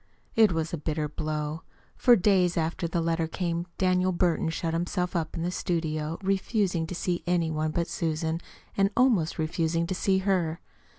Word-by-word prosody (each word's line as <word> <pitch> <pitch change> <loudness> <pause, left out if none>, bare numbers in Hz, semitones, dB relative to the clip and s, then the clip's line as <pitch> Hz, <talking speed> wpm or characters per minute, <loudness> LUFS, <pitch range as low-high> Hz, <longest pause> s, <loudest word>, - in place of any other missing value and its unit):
It 220 -3 +6
was 165 0 -2
a 170 - -2
bitter 155 0 -2
blow. 150 +1 -3 0.3
For 245 - +6
days 185 -3 +3
after 165 +1 -1
the 170 0 -1
letter 165 0 0
came, 170 0 -2
Daniel 185 0 +2
Burton 175 -2 +1
shut 165 0 -2
himself 180 +2 -1
up 160 -1 -2
in 165 - -2
his 175 +1 -1
studio 160 -2 -2
refusing 190 -3 0
to 180 - -5
see 175 0 -1
any 170 -2 +1
one 155 0 0
but 170 +2 0
Susan, 160 0 -2 0.3
and 195 0 +3
almost 230 -11 +3
refusing 165 +1 0
to 185 - -2
see 190 +1 +2
her. 185 -4 0
170 Hz, 175 wpm, -27 LUFS, 160-185 Hz, 0.3 s, It